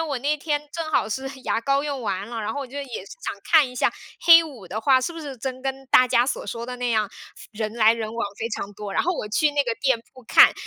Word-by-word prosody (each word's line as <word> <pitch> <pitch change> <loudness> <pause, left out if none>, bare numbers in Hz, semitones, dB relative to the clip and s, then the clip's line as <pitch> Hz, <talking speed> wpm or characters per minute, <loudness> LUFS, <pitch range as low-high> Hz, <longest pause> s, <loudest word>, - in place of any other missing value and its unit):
我 305 -4 -1
那 290 +4 0
天 295 -1 -1
正 330 -2 -4
好 - - +2
是 265 +5 -3
牙 225 - 0
膏 275 +3 +1
用 285 -2 -3
完 200 -2 -3
了， 230 -1 -4
然 215 +1 -3
后 285 - -3
我 275 - -5
就 275 +3 -7
也 285 - -4 0.2
是 - - -15 0.2
想 - - -2
看 310 -5 +5
一 250 - -11
下 - - +1 0.3
黑 335 -1 +9
五 250 - -11
的 210 +5 -4
话， 260 +2 +4
是 340 +7 -3
不 330 - -8
是 285 -4 -7
真 255 +2 -5
跟 270 0 -4
大 255 -1 +6
家 240 -1 +3
所 265 - -3
说 230 +3 -5
的 250 +1 -6
那 245 0 -2
样， 215 -3 +1 0.4
人 215 -1 -4
来 220 -1 +5
人 225 -1 -4
往 230 -2 -1
非 230 - -2
常 205 -1 -4
多。 205 -1 -7
然 - - +1
后 360 - +1
我 265 - -4
去 295 +8 +2
那 290 -1 +1
个 235 -2 -1
店 265 -3 +2
铺 255 - -15
看， 225 - +7
255 Hz, 300 characters per minute, -24 LUFS, 225-285 Hz, 0.4 s, 黑